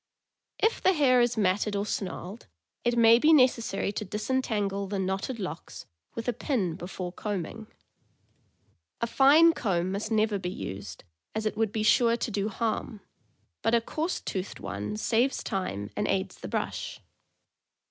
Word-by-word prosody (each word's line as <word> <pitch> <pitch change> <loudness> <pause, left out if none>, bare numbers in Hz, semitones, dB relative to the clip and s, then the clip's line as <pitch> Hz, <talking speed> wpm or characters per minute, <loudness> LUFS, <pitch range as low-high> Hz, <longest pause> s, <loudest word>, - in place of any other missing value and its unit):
If 450 - +1
the 380 - +4
hair 260 -6 +4
is 240 -1 +1
matted 205 +1 +1
or 200 +1 0
snarled, 195 +1 -5 0.4
it 240 0 +1
may 230 0 +7
be 305 +5 +5
necessary 245 -9 +3
to 210 - -4
disentangle 210 -2 -1
the 200 +1 -3
knotted 190 +6 -2
locks 180 -4 -6 0.3
with 230 - -5
a 245 - +2
pin 220 - -1
before 180 0 -6
combing. 210 +2 -4 1.3
A - - +1
fine 295 +7 +6
comb 185 - -1
must 200 +2 -3
never 215 -2 +1
be 180 - -3
used, 100 - -7 0.3
as 220 0 -2
it 215 - -1
would 220 -1 0
be 215 0 -1
sure 230 +2 +4
to 235 - -3
do 205 0 -1
harm, 220 -1 -3 0.6
but 225 +1 +3
a - - +5
coarse 315 +9 -2
toothed 190 0 -5
one 105 +1 -4
saves 240 - +1
time 100 - -3
and - - -1
aids - - -1
the - - -6
brush. - - -3
215 Hz, 155 wpm, -28 LUFS, 195-240 Hz, 1.3 s, may